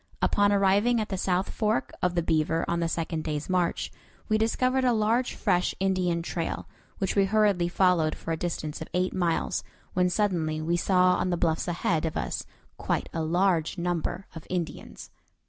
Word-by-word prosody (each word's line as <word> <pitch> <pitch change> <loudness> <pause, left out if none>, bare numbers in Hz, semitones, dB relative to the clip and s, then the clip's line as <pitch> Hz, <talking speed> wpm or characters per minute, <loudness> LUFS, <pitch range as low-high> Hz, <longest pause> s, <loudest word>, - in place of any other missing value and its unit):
Upon 205 0 +3
arriving 200 +4 +3
at 215 - -2
the 195 - -2
south 185 0 0
fork 210 - 0
of 180 -1 +1
the 170 - +1
Beaver 160 0 +1
on 170 - 0
the 170 -1 0
second 165 -1 -2
day's 150 -1 -3
march, 180 -2 0 0.4
we 215 0 +2
discovered 255 +4 +1
a 250 -1 +3
large 225 +3 +1
fresh 180 0 +1
Indian 185 -3 +1
trail, 165 -1 -3 0.3
which 195 - -1
we 200 -1 +4
hurriedly 200 -4 +2
followed 175 -3 +2
for 165 - -6
a - - +1
distance 155 -2 -4
of 160 - -5
eight 185 +1 +1
miles, 170 -3 0 0.3
when 180 0 +2
suddenly 175 -6 0
we 165 +2 0
saw 180 +1 +3
on 185 - 0
the 175 - 0
bluffs 165 0 0
ahead 165 -2 0
of 160 - -4
us - - -3 0.3
quite - - -2
a 165 - -1
large 175 +1 +1
number 175 +1 -2
of 160 - -10
Indians. 175 -3 -5
180 Hz, 180 wpm, -27 LUFS, 165-195 Hz, 0.4 s, we